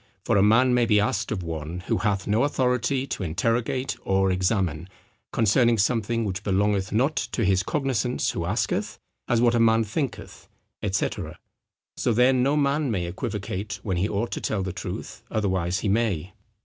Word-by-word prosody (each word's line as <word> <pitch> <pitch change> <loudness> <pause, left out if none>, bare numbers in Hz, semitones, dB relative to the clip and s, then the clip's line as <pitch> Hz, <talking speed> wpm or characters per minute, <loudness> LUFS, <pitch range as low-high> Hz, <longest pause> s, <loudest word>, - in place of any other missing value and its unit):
For - - +2
a 100 - +5
man 115 +5 +5
may 120 -1 +3
be 105 -2 +4
asked 105 - 0
of 95 -5 -2
one, 80 +1 -5
who - - -1
hath 100 -3 0
no 110 +4 +2
authority 130 -1 +1
to 130 - -5
interrogate 115 +9 -1
or 95 0 +2
examine, 90 -3 0 0.4
concerning 115 +2 +3
something 115 +2 +1
which 95 -3 -3
belongeth 100 -1 +1
not 130 +9 +1
to 115 - -1
his 95 0 +3
cognizance 125 0 -1
who - - -3
asketh, - - -1 0.3
as 120 -1 +2
what 120 -1 +4
a 120 - +2
man 115 0 +4
thinketh, 130 +5 -5 0.4
&c. 95 - +1 0.9
So 120 - +1
then 125 +2 +4
no 140 +4 +2
man 145 0 +1
may 95 -6 -1
equivocate 100 +2 -4
when 95 -4 -1
he 95 +4 0
ought 105 +4 -2
to - - -4
tell 100 -3 -1
the 95 -2 -4
truth, - - -6
otherwise 95 -4 -1
he - - -1
may." 100 -4 0
105 Hz, 175 wpm, -25 LUFS, 95-120 Hz, 0.9 s, a